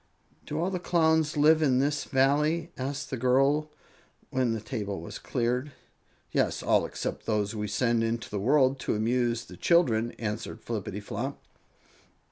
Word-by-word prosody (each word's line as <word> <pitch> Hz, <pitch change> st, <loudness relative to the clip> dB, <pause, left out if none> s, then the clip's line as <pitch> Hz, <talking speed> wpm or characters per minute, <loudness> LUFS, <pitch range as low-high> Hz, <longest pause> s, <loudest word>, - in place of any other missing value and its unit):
"Do 150 Hz, -, -3 dB
all 180 Hz, +3 st, 0 dB
the 180 Hz, -, -2 dB
Clowns 160 Hz, -3 st, +2 dB
live 155 Hz, +2 st, +5 dB
in 135 Hz, -5 st, +3 dB
this 145 Hz, +2 st, 0 dB
Valley?" 150 Hz, +5 st, +2 dB
asked 140 Hz, +1 st, -4 dB
the 130 Hz, -, -2 dB
girl, 135 Hz, +5 st, +2 dB, 0.6 s
when 130 Hz, -2 st, +1 dB
the 115 Hz, -, -1 dB
table 105 Hz, -3 st, -4 dB
was 85 Hz, -, -8 dB
cleared. 125 Hz, +3 st, -1 dB, 0.6 s
"Yes, -, -, 0 dB
all -, -, +3 dB
except -, -, -5 dB
those 105 Hz, -1 st, 0 dB
we 105 Hz, -1 st, -3 dB
send 115 Hz, +3 st, +1 dB
into 115 Hz, +1 st, -2 dB
the 100 Hz, -, -2 dB
world 135 Hz, +4 st, +3 dB
to -, -, -1 dB
amuse 115 Hz, +1 st, 0 dB
the -, -, -12 dB
children," 120 Hz, -10 st, +2 dB
answered 105 Hz, -2 st, -5 dB
Flippityflop. -, -, -4 dB
130 Hz, 150 wpm, -28 LUFS, 115-150 Hz, 0.6 s, live